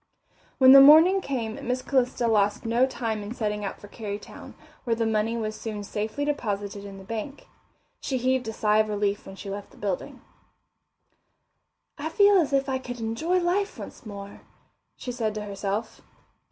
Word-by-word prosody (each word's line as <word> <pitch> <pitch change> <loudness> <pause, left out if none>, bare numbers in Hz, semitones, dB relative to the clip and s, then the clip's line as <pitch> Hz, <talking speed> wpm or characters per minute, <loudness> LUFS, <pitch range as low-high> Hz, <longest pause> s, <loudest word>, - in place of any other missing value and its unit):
When 260 -1 +8
the 275 0 +11
morning 320 +7 +8
came 235 -8 -3
Miss 250 +1 -1
Calista 250 -3 +1
lost 205 -2 +1
no 235 +3 +3
time 225 -5 -3
in 205 +4 -7
setting 210 -2 -2
out 195 - -5
for 205 - -12
Kerrytown, 205 -1 -8 0.3
where 235 -3 0
the 225 0 0
money 220 +1 0
was 215 -1 -3
soon 215 -2 -6
safely 215 +7 -3
deposited 205 -8 -3
in 195 -1 -9
the 195 - -11
bank. 230 +7 -6 0.5
She 265 - -2
heaved 255 -1 0
a - - -2
sigh 215 -1 +2
of 215 0 +2
relief 205 -1 -1
when 195 - -9
she 195 0 -7
left 200 0 -6
the - - -20
building. 195 -3 -4 1.8
I 305 +2 -3
feel 405 +4 +5
as 310 -5 0
if 275 0 +1
I 260 -1 -1
could 245 -1 -7
enjoy 230 +11 0
life 385 +4 0
once - - -9
more, 200 -2 -9 0.6
she 250 - -5
said 225 -3 -2
to 210 - -4
herself. 200 +2 -4
225 Hz, 180 wpm, -26 LUFS, 205-260 Hz, 1.8 s, the